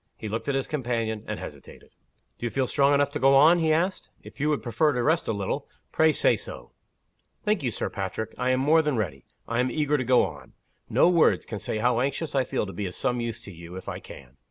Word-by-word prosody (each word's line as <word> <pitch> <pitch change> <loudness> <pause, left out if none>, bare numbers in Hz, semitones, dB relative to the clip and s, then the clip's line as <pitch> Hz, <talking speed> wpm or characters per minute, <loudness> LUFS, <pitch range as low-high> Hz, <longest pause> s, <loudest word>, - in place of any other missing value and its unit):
He - - -6
looked 115 +4 -3
at 140 - +1
his 135 - 0
companion, 115 -6 -2
and - - -4
hesitated. - - -11 0.5
"Do 120 - -2
you - - -2
feel 135 +2 0
strong 140 +2 +3
enough 140 0 +2
to 150 - -3
go 135 0 +5
on?" 160 +6 +6
he 160 -1 +2
asked. 180 +4 0
"If - - -13
you 150 +2 +1
would 150 - 0
prefer 130 +6 +2
to 125 -1 -1
rest 160 +4 +1
a - - +1
little, 100 -3 -3 0.2
pray 160 0 +4
say - - +3
so." - - -9 0.7
"Thank 210 -3 +1
you, 130 - 0
Sir - - -3
Patrick. 100 +2 -4
I 125 - -1
am 130 0 +2
more 155 +4 +5
than 150 -5 -1
ready, 80 - -3 0.2
I 115 +1 -1
am 125 +1 +2
eager 150 +2 0
to - - 0
go 125 0 +4
on. - - -10 0.4
No - - +4
words 175 -2 +3
can 105 - -5
say 110 - -3
how 120 +2 +2
anxious 140 +4 -2
I 135 -2 +2
feel - - -1
to 95 - -8
be 100 -2 -3
of 90 - -8
some 125 -1 -1
use 115 -2 -4
to 100 - -10
you, 85 0 -11
if 95 - -9
I - - -4
can. 65 -1 -13
130 Hz, 250 wpm, -26 LUFS, 110-150 Hz, 0.7 s, on